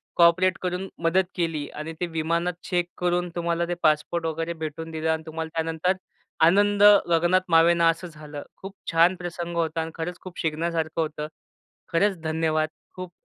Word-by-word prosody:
Cooperate 175 Hz, +2 st, +4 dB
करून 180 Hz, +1 st, -2 dB, 0.2 s
मदत 185 Hz, +3 st, +3 dB
केली 165 Hz, -4 st, -1 dB
आणि 155 Hz, +2 st, -5 dB
ते 180 Hz, -, 0 dB
विमानात 170 Hz, +2 st, -1 dB
चेक 175 Hz, -2 st, 0 dB
करून 175 Hz, 0 st, 0 dB
तुम्हाला 170 Hz, 0 st, 0 dB
ते 175 Hz, -, -1 dB
पासपोर्ट 155 Hz, +2 st, +2 dB
वगैरे 165 Hz, +1 st, -2 dB
भेटून 160 Hz, 0 st, -6 dB
दिलं. 160 Hz, 0 st, -2 dB
आणि 160 Hz, 0 st, -2 dB
तुम्हाला 160 Hz, 0 st, -5 dB
त्यानंतर 165 Hz, +3 st, 0 dB, 0.5 s
आनंद 205 Hz, +3 st, +4 dB, 0.3 s
गगनात 175 Hz, +3 st, +3 dB
मावेना 170 Hz, +1 st, +5 dB
असं 170 Hz, +2 st, -2 dB
झालं. 150 Hz, -2 st, -9 dB
खूप 195 Hz, +1 st, -9 dB, 0.2 s
छान 170 Hz, +3 st, +5 dB
प्रसंग 175 Hz, -1 st, -5 dB
होता 165 Hz, 0 st, 0 dB
आणि 160 Hz, 0 st, -5 dB
खरंच 175 Hz, +2 st, -5 dB
खूप 185 Hz, -2 st, -10 dB
शिकण्यासारखं 160 Hz, 0 st, -1 dB
होतं. 150 Hz, -1 st, -3 dB, 0.7 s
खरंच 195 Hz, +2 st, +2 dB
धन्यवाद. 155 Hz, -1 st, 0 dB, 0.3 s
खूप 185 Hz, -1 st, -7 dB
165 Hz, 160 wpm, -25 LUFS, 160-175 Hz, 0.7 s, मावेना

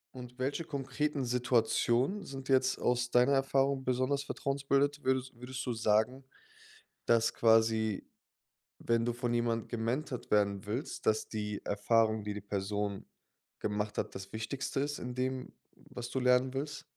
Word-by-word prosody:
Und 125 Hz, 0 st, -9 dB
welche 140 Hz, +6 st, -1 dB
konkreten 140 Hz, -1 st, -2 dB
Situationen 125 Hz, -, +2 dB
sind 135 Hz, -4 st, -8 dB
jetzt 130 Hz, -1 st, +3 dB
aus 125 Hz, 0 st, +1 dB
deiner 125 Hz, +3 st, +4 dB
Erfahrung 135 Hz, 0 st, +2 dB
besonders 130 Hz, +2 st, +1 dB
vertrauensbildend? 140 Hz, +1 st, 0 dB
Würdet 130 Hz, 0 st, +1 dB
würdest 125 Hz, +2 st, -6 dB
du 125 Hz, -, -1 dB
sagen, 110 Hz, +4 st, +1 dB, 0.8 s
dass 115 Hz, -1 st, +3 dB
quasi, 110 Hz, -2 st, +3 dB, 0.7 s
wenn 115 Hz, 0 st, +1 dB
du 120 Hz, -, 0 dB
von 120 Hz, 0 st, -2 dB
jemand 120 Hz, -1 st, 0 dB
gementored 120 Hz, +3 st, -3 dB
werden 100 Hz, -1 st, +2 dB
willst, 120 Hz, +8 st, -4 dB
dass 110 Hz, 0 st, +2 dB
die 105 Hz, -2 st, -4 dB
Erfahrung, 110 Hz, +1 st, +2 dB
die 105 Hz, 0 st, -3 dB
die 105 Hz, -, -6 dB
Person 100 Hz, 0 st, -3 dB, 0.5 s
gemacht 105 Hz, 0 st, -2 dB
hat, -, -, -3 dB
das 95 Hz, +1 st, -8 dB
Wichtigste 130 Hz, +5 st, -3 dB
ist 145 Hz, +1 st, -1 dB
in 125 Hz, 0 st, -5 dB
dem, 130 Hz, 0 st, -3 dB, 0.2 s
was 120 Hz, 0 st, -8 dB
du 130 Hz, -, -1 dB
lernen 125 Hz, 0 st, +3 dB
willst? 145 Hz, +1 st, -4 dB
125 Hz, 145 wpm, -32 LUFS, 110-135 Hz, 0.8 s, deiner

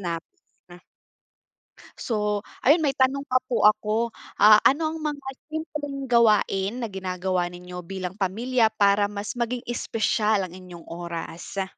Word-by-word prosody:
namin. 175 Hz, 0 st, -9 dB, 1.2 s
So, 210 Hz, -2 st, -1 dB, 0.2 s
ayun 305 Hz, +4 st, +4 dB
may 275 Hz, -, +2 dB
tanong 270 Hz, +1 st, +1 dB
pa 255 Hz, -2 st, +2 dB
po 240 Hz, -, +1 dB
ako. 220 Hz, +2 st, +3 dB, 0.2 s
Ah, 210 Hz, +1 st, +8 dB
ano 315 Hz, +3 st, 0 dB
ang 320 Hz, -, -5 dB
mga 290 Hz, -3 st, -4 dB, 0.2 s
simpleng 295 Hz, -3 st, -5 dB
gawain 230 Hz, -2 st, +2 dB
na -, -, -3 dB
ginagawa 185 Hz, -1 st, -2 dB
ninyo 180 Hz, 0 st, -9 dB
bilang 185 Hz, +1 st, -5 dB
pamilya 225 Hz, +5 st, +2 dB
para 205 Hz, -1 st, +3 dB
mas 205 Hz, 0 st, -5 dB
maging 245 Hz, 0 st, -3 dB
espesyal 220 Hz, -3 st, 0 dB
ang 180 Hz, -, -9 dB
inyong 180 Hz, -2 st, -11 dB
oras? 170 Hz, +2 st, -5 dB
210 Hz, 130 wpm, -25 LUFS, 185-255 Hz, 1.2 s, Ah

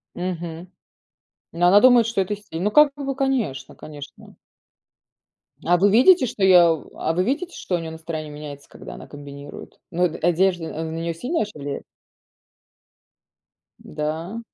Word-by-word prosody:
Мгм. 175 Hz, -1 st, -5 dB, 0.8 s
Ну 170 Hz, +1 st, -1 dB
она 200 Hz, +3 st, +7 dB
думает, 245 Hz, -3 st, +6 dB
что 230 Hz, -4 st, -1 dB
это 200 Hz, +2 st, -1 dB
стиль. 185 Hz, -5 st, -8 dB
Ну 210 Hz, -, +1 dB
как 300 Hz, +3 st, +6 dB
бы, 275 Hz, -1 st, -4 dB
конечно, 250 Hz, -, -2 dB
конечно. 145 Hz, -2 st, -12 dB, 1.3 s
А 175 Hz, -, +4 dB
вы 200 Hz, +3 st, +3 dB
видите, 260 Hz, -, +6 dB
что 205 Hz, -4 st, -2 dB
я 175 Hz, -3 st, +7 dB
у 160 Hz, -, -8 dB
а 160 Hz, -, 0 dB
вы 180 Hz, +2 st, +1 dB
видите 320 Hz, +8 st, -2 dB
что 180 Hz, -, -4 dB
у -, -, +2 dB
неё 165 Hz, -1 st, -6 dB
настроение 160 Hz, -1 st, -6 dB
меняется, 145 Hz, -1 st, -9 dB
когда -, -, -11 dB
она -, -, -11 dB
комбинирует? 145 Hz, 0 st, -11 dB
Ну 175 Hz, +2 st, 0 dB
од 165 Hz, -2 st, -2 dB
одежда 175 Hz, -2 st, 0 dB
на 160 Hz, -, -5 dB
неё 165 Hz, +1 st, -3 dB
сильно 250 Hz, -, -2 dB
ваще 210 Hz, -7 st, -4 dB
влияет? 140 Hz, 0 st, -5 dB, 2.0 s
Да? 160 Hz, +8 st, -5 dB
175 Hz, 155 wpm, -22 LUFS, 160-210 Hz, 2.0 s, она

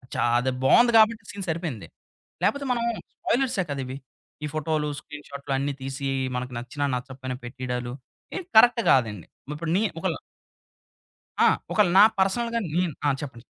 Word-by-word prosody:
చా -, -, +1 dB, 0.2 s
అదే 130 Hz, +2 st, 0 dB
బావుంది 240 Hz, -, +6 dB
గాబట్టి 220 Hz, -1 st, +4 dB
సీన్ 200 Hz, -2 st, -6 dB
సరిపేయింది. 155 Hz, -, -3 dB, 0.6 s
లేపోతే 280 Hz, 0 st, +1 dB
మనం 235 Hz, -1 st, -1 dB, 0.3 s
స్పాయిలర్సే 245 Hz, -6 st, 0 dB
కదా! 140 Hz, -, -2 dB
ఇవి. 130 Hz, +1 st, -6 dB, 0.5 s
ఈ -, -, -1 dB
ఫోటో‌లు 155 Hz, -1 st, -1 dB
స్క్రీన్‌ 150 Hz, -1 st, -11 dB
షాట్‌లన్నీ 140 Hz, 0 st, -2 dB
తీసి 135 Hz, +1 st, -4 dB, 0.3 s
మనకు 125 Hz, 0 st, -5 dB
నచ్చినా 145 Hz, +4 st, -3 dB
నచ్చకపేయినా 130 Hz, 0 st, -5 dB
పెట్టిడా‌లు 125 Hz, 0 st, -4 dB, 0.5 s
ఇద్ 365 Hz, -, -10 dB
కరెక్ట్ 240 Hz, +1 st, +7 dB
గాదండి. 110 Hz, -9 st, +1 dB, 0.2 s
మిప్పుడు 160 Hz, +2 st, -3 dB
ని -, -, +2 dB, 0.2 s
ఒకల -, -, -1 dB, 1.3 s
ఆ! -, -, +7 dB, 0.2 s
ఒకల 210 Hz, -4 st, +4 dB
నా 200 Hz, -, +10 dB, 0.2 s
పర్సనల్‌గా 230 Hz, +5 st, +1 dB
నేను 175 Hz, -2 st, +1 dB
ఆ! -, -, +5 dB
చెప్పండి? 125 Hz, -5 st, -8 dB
145 Hz, 145 wpm, -25 LUFS, 130-200 Hz, 1.3 s, నా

